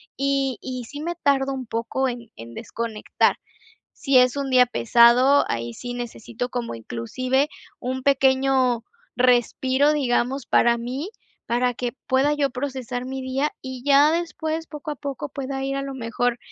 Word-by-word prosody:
y 275 -2 0
y 255 -2 -5
sí, 290 +5 -8
me 345 +2 -3
tardo 275 -4 +1
un 260 -1 -5
poco 230 +4 -1
en 240 -2 -6
en 115 +1 -10
desconectar. 225 - -1 0.5
Si 275 -3 +3
es 250 +1 +4
un 280 -1 -2
día 250 -1 +6
pesado, 245 +4 +5
ahí 115 0 -3
sí 245 - -6
necesito 240 0 -5
como 245 - -4
inclusive 255 - -1 0.3
un 260 +1 -4
pequeño 265 -3 +3 0.3
respiro, 255 +3 +3
digamos, 265 -2 0
para 235 0 +4
mí, 255 +8 -4 0.4
para 245 +1 +1
que 245 0 -3 0.2
pueda 275 +3 +3
yo 285 -2 0
procesar 255 -1 -4
mi 265 0 -5
día 270 +3 -1
y 260 -1 -7
ya 285 +1 +6
después, 325 -1 -2
poco 300 -1 -7
a 295 - -4
poco, 280 +2 -5
pueda 270 -1 -4
ir 275 0 -2
a 275 - -2
lo 275 0 -5
mejor 245 0 -1
260 Hz, 160 wpm, -23 LUFS, 245-275 Hz, 0.5 s, día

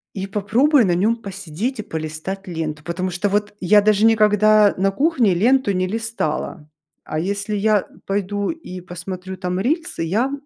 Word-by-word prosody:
И 195 -1 -3
попробую 220 +6 +3
на 175 - +2
нем 210 +6 +2
посидеть 200 - -5
и - - -3
полистать 160 +3 -5
ленту. 160 -3 -4
Потому 185 +2 -3
что 180 +3 -1
вот 205 +1 -1
я 205 +3 +5
даже 210 0 +3
никогда 215 -1 +5
на 195 +1 +2
кухне 240 - +2
ленту 240 +3 +3
не 185 0 0
листала, 215 -8 -3 0.4
а 155 - -4
если 200 +4 -2
я 210 -1 +2 0.2
пойду 200 +1 -1
и 320 - -8
посмотрю 185 +1 -7
там 180 0 -3
рилсы, 315 - -1
я 215 +11 0
200 Hz, 160 wpm, -21 LUFS, 180-215 Hz, 0.4 s, я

